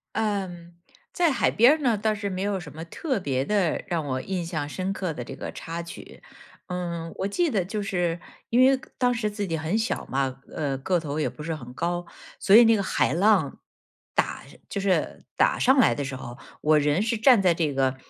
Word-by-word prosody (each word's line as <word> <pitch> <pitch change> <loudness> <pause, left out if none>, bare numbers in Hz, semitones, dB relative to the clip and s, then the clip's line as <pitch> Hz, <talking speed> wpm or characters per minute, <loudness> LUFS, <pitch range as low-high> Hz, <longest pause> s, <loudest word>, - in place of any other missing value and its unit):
嗯， 190 -6 -2 0.4
在 345 -3 +2
海 260 - +2
边 235 +5 +6
儿 315 - -2
呢， 240 -6 +2
倒 215 +1 +1
是 205 -1 -3
没 185 -1 -4
有 200 -1 -1
什 170 -4 -10
么 160 +2 -8
特 260 - -2
别 135 -7 -1
的 190 -1 0
让 165 -4 -1
我 130 -2 -2
印 185 -3 -3
象 155 -4 -3
深 185 +4 -3
刻 185 -3 -3
的 125 - -6
这 - - -8
个 - - -6
插 165 +1 -6
曲。 170 - -11 0.5
嗯， 170 -2 -4
我 195 - -1
记 335 - +1
得 200 -9 0
就 210 +3 -3
是 175 -4 -1 0.3
因 240 +2 +4
为 265 0 +5 0.2
当 250 -1 +3
时 225 -3 -1
自 205 -1 -3
己 165 -2 -1
很 160 +5 -2
小 225 +1 -2
嘛， 135 -1 -2 0.2
呃， 140 -3 -1
个 175 +7 0
头 150 -2 -4
也 155 - +1
不 - - -11
是 165 +1 -3
很 125 -4 -10
高。 175 +4 -2 0.3
所 195 - +5
以 235 - +10
那 225 -1 +5
个 200 - 0
海 - - +1
浪， 185 -4 +2 0.5
打 - - -1 0.3
就 - - -3
是 195 -2 0
打 - - +3
上 265 +2 +4
来 245 - +5
的 145 - -3
时 135 0 -5
候， 120 -1 -8 0.2
我 155 0 +4
人 150 +4 +2
是 230 +2 0
站 230 -1 +6
在 180 -3 +4
这 155 -4 0
个， 135 -1 +1
180 Hz, 235 characters per minute, -25 LUFS, 155-210 Hz, 0.5 s, 以